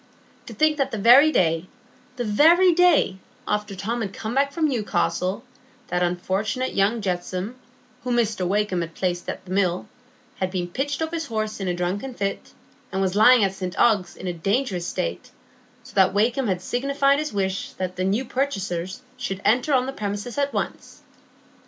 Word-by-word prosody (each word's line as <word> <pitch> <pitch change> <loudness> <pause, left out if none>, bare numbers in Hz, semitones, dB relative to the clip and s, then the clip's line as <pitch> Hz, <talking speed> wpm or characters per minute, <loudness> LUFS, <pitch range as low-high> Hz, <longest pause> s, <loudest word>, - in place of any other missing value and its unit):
To - - -8
think 310 -1 +3
that 275 - +1
the 225 - -4
very 250 +9 +7
day—the 245 - -2
very 330 - +5
day—after 210 - +1
Tom 225 +5 -3
had 200 -3 -4
come 220 +1 -4
back 280 +2 +2
from 320 +1 +1
Newcastle, 210 -4 -1 0.5
that 180 0 0
unfortunate 190 +8 -1
young 205 +4 +1
Jetsome, 185 +2 -3 0.5
whom 245 -1 0
Mr 215 -6 0
Wakem 200 -2 0
had 165 -1 -6
placed 180 -1 -2
at - - -6
the 185 - -10
Mill, 185 -1 0 0.5
had 185 - -1
been 180 -2 -3
pitched 285 - -2
off 320 - -3
his 325 -2 -3
horse 215 -2 -3
in 195 - -3
a 180 - 0
drunken 195 +9 -3
fit, 200 -2 -3 0.4
and 190 - -2
was 190 -1 0
lying 225 +2 +7
at 195 -1 +1
St 185 -2 -5
Ogg's 205 -7 +2
in - - -9
a 180 - -2
dangerous 195 +1 -1
state, 85 +1 -3 0.5
so - - -15
that 190 0 +3
Wakem 235 +5 +2
had 185 -2 -1
signified 275 +2 +1
his 305 0 -3
wish 195 -2 -2
that 185 -1 -4
the 185 - -2
new 205 +7 0
purchasers 195 -6 -3
should 195 0 -4
enter 245 +7 +3
on 255 -2 +3
the 270 - -4
premises 205 +1 -4
at 280 0 +1
once! - - -5
210 Hz, 175 wpm, -24 LUFS, 185-255 Hz, 0.5 s, very